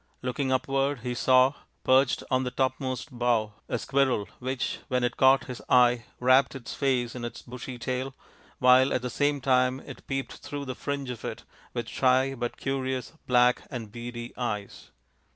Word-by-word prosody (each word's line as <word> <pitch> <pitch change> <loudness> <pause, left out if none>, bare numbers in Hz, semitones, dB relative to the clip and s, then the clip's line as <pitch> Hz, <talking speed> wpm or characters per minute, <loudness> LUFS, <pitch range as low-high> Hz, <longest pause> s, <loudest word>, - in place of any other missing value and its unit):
Looking 130 +2 -1
upward 135 0 0
he 125 0 -3
saw, 130 +2 +4 0.3
perched 130 0 +3
on 130 0 +3
the 125 - -1
topmost 130 0 -2
bough, 120 -3 +1 0.2
a - - 0
squirrel 135 -7 +1
which, 130 +1 -2
when 125 -3 0
it 120 -1 0
caught 135 +1 +5
his 125 -2 -7
eye, 125 -1 +5
wrapped 130 +2 +4
its 130 -3 -7
face 125 -4 0
in 125 - -6
its 120 0 -6
bushy 125 0 -7
tail, 130 +2 -3 0.4
while 130 +1 +5
at 125 - -1
the 125 - -3
same 145 +2 +1
time 130 0 +2
it - - -11
peeped 135 0 -3
through 145 -1 -6
the 130 - -4
fringe 140 0 -4
of 120 - -8
it - - -5 0.3
with 120 -2 -2
shy 130 +1 +2
but 120 -2 -4
curious, 130 -1 -2
black, 125 0 +4
and 115 -6 -6
beady 120 +1 -7
eyes. 105 -5 -4
130 Hz, 170 wpm, -27 LUFS, 120-135 Hz, 0.4 s, caught